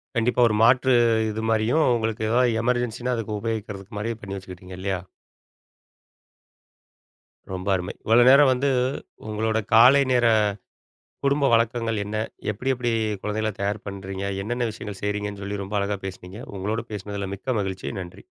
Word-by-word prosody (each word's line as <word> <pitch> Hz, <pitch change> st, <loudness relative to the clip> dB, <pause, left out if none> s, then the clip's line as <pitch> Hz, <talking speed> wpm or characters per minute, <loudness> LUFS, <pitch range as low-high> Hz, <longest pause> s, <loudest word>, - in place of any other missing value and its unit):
கண்டிப்பா. 120 Hz, +1 st, +2 dB
ஒரு 105 Hz, -, 0 dB
மாற்று 130 Hz, +2 st, +5 dB, 0.4 s
இது 110 Hz, +1 st, -4 dB
மாரியும் 115 Hz, +8 st, +2 dB
உங்களுக்கு 110 Hz, -1 st, -2 dB
ஏதாவது 120 Hz, 0 st, +3 dB
எமர்ஜென்சின்னா 125 Hz, 0 st, 0 dB
அதுக்கு 110 Hz, -2 st, -3 dB
உபயோகிக்கிறதுக்கு 105 Hz, -3 st, -5 dB
மாரியே 115 Hz, +1 st, -3 dB
பண்ணி 100 Hz, -1 st, -6 dB
வச்சுக்கிட்டிங்க 90 Hz, -1 st, -10 dB
இல்லையா? 95 Hz, -1 st, -2 dB, 2.5 s
ரொம்ப 95 Hz, +1 st, -5 dB
அருமை! 90 Hz, -1 st, -4 dB
இவ்வளோ 115 Hz, +2 st, +6 dB
நேரம் 140 Hz, 0 st, +7 dB
வந்து 135 Hz, +3 st, 0 dB, 0.6 s
உங்களோட 110 Hz, +1 st, -1 dB, 0.2 s
காலை 125 Hz, +5 st, +8 dB
நேர 125 Hz, -1 st, +3 dB, 1.0 s
குடும்ப 140 Hz, 0 st, +3 dB
வழக்கங்கள் 115 Hz, -1 st, +1 dB
என்ன 105 Hz, +1 st, -4 dB, 0.4 s
எப்டி 125 Hz, +6 st, -3 dB
எப்டி 120 Hz, -1 st, -1 dB, 0.3 s
குழந்தைகள 110 Hz, +1 st, -1 dB
தயார் 105 Hz, +1 st, -2 dB
பண்றீங்க? 95 Hz, 0 st, -5 dB, 0.2 s
என்னென்ன 120 Hz, +3 st, -1 dB
விஷயங்கள் 105 Hz, -2 st, -8 dB
செய்றீங்கன்னு 105 Hz, 0 st, -3 dB
சொல்லி 100 Hz, 0 st, -4 dB
ரொம்ப 100 Hz, +2 st, -4 dB
அழகா 100 Hz, 0 st, -1 dB
பேசினீங்க. 95 Hz, +2 st, -8 dB, 0.2 s
உங்களோடு 105 Hz, +4 st, -2 dB
பேசனதில 100 Hz, -1 st, -5 dB
மிக்க 120 Hz, +4 st, -2 dB
மகிழ்ச்சி 95 Hz, +2 st, -4 dB
நன்றி. 90 Hz, -2 st, -10 dB
110 Hz, 135 wpm, -24 LUFS, 100-120 Hz, 2.5 s, காலை